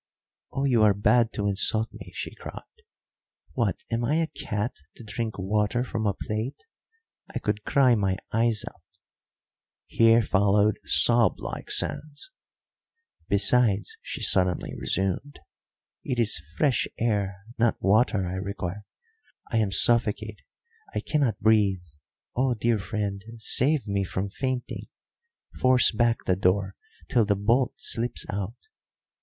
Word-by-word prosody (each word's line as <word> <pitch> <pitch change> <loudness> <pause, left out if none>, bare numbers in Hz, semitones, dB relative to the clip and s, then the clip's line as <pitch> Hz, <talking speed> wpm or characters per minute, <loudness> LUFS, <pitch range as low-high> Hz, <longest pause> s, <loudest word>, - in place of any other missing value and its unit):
"Oh, 135 - -2
you 125 -5 +3
are 105 -2 +5
bad 110 +3 +3
to 100 -1 -1
insult 110 +3 +2
me!" - - -11
she - - -5
cried. - - -9 0.9
"What, 100 -3 -1
am 115 +1 0
I 145 +6 +1
a 165 0 +2
cat 105 -6 -4 0.2
to - - -12
drink 110 0 -4
water 105 +5 0
from 110 -4 -2
a 100 - 0
plate? 110 +7 -4 0.7
I - - -4
could 105 0 -2
cry 130 -3 +4
my 95 -4 +1 0.2
eyes 115 -1 +1
out"; - - -10 1.0
here 115 0 +4
followed 105 +1 +2
sob 120 -2 +5
like - - -6
sounds. 150 - -2 1.0
"Besides," 105 -1 +2
she - - -6
suddenly 90 -1 +3
resumed, 95 +10 -2 0.7
"it 125 - -2
is 110 -8 +1 0.2
fresh 140 -5 +2
air, 100 -4 0 0.2
not 120 -1 +2
water, 105 -1 +2
I 90 +1 -4
require. 100 0 -5 0.7
I 115 - +1
am 105 -3 +1
suffocated, 110 -1 +1 0.5
I - - +1
cannot 135 -9 0
breathe. 105 -4 +3 0.5
Oh, 130 0 +1
dear 115 0 +1
friend, 100 -1 -3
save 130 +6 +1
me 100 -2 -1
from 95 +1 -3
fainting. 130 +2 -4 0.7
Force 130 -1 +4
back 115 +1 +1
the 90 - +2
door 95 +1 +1 0.3
till 120 - +3
the 105 -1 +1
bolt 115 +6 +1
slips 120 -8 -1
out." 100 +3 -4
110 Hz, 135 wpm, -26 LUFS, 100-120 Hz, 1.0 s, are